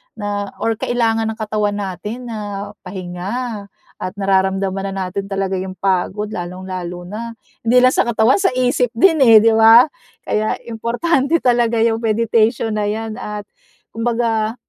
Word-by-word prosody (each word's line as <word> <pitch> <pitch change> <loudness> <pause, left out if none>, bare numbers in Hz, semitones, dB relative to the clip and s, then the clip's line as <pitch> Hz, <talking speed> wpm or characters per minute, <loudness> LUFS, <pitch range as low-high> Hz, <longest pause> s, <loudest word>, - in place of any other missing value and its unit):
na 205 -2 -4
or 225 0 +1
kailangan 225 -1 0
ng 220 0 -5
katawan 210 -1 -1
natin 210 +5 -5
na 205 -3 -5
pahinga 200 +4 -5 0.3
at 185 - -4
nararamdaman 195 0 0
na 190 -1 -3
natin 195 +2 -4
talaga 195 -1 -2
yung 185 0 -6
pagod 195 +2 -1
lalong-lalo 180 -1 -6
na 230 +4 -6 0.3
hindi 245 +2 +5
lang 255 - +6
sa - - +2
katawan 235 - +3
sa 385 - +3
isip 250 -1 +1
din 325 +6 +4
eh, 225 -3 +8
'di 225 - +5
ba? 225 +2 +8 0.4
Kaya 215 0 0 0.2
importante 270 +7 +1
talaga 240 -2 +2
yung 225 -1 +1
meditation 225 0 +1
na 210 -1 0
yan 220 +1 -3
at 210 0 -5 0.5
kumbaga 225 -1 -1
215 Hz, 145 wpm, -18 LUFS, 195-230 Hz, 0.5 s, eh